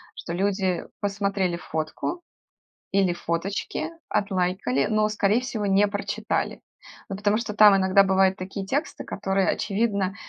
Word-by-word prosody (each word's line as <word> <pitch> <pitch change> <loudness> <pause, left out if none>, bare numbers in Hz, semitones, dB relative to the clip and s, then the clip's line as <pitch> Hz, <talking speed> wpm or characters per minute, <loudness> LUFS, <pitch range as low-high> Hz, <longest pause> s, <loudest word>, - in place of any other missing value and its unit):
что 170 - -6
люди 190 -1 0 0.2
посмотрели 200 -3 0
фотку 160 - -4 0.7
или 190 -2 +3
фоточки, 180 - -3 0.2
отлайкали, 180 -9 0
но, 215 0 +2
скорее 215 +1 +2
всего, 230 -5 -3
не 200 +1 +4
прочитали. 205 +2 -2 0.5
Ну, 195 - -3
потому 210 +1 +1
что 230 -2 -3
там 210 -2 +8
иногда 190 +1 +5
бывают 190 0 +3
такие 195 +1 -6
тексты, 285 +9 -2
которые, 195 -1 -1
очевидно, 200 -2 0
195 Hz, 130 wpm, -25 LUFS, 190-210 Hz, 0.7 s, там